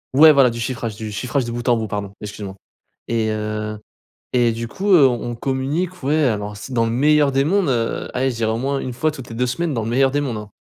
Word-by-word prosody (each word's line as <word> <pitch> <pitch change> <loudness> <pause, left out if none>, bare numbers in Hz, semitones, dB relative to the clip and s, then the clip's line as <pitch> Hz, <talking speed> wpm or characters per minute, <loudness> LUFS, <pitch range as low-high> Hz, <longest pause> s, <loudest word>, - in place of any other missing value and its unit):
ouais 155 +2 +9
voilà 135 -4 +5
du 115 0 -6
chiffrage 115 -2 -3
du 110 -1 -6
chiffrage 125 +4 -1
de 120 - -4
bout 120 +1 -5
en 120 - +4
bout 110 -1 -3
pardon 100 -1 -4
excuse-moi. 100 -2 -7 0.5
Et 115 -2 0
heu, 110 0 -3 0.6
et 120 -2 +3
du 115 0 -4
coup, 200 - -2
heu, 145 -6 +8
on 120 -2 -1
on - - -5
communique 145 +9 -2
ouais 150 +3 +2
alors 105 -3 -1
c 130 +5 -8
dans 115 -1 +2
le 115 - -1
meilleur 145 +3 +3
des 135 +1 +2
mondes, 190 -1 +2
heu, 115 -3 -1
aller, 130 +1 +1
je 115 - -7
dirais 110 -1 0
au 110 - -1
moins 135 +2 -1
1 125 - -4
fois 155 +6 0
toutes 130 -5 -10
les 115 - -7
2 125 +2 +1
semaines 160 +4 -1
dans 115 - -1
le 115 - -3
meilleur 135 +2 +3
des 145 +1 0
mondes, 125 -6 -3
hein. 105 -1 -8
120 Hz, 265 wpm, -20 LUFS, 110-140 Hz, 0.6 s, ouais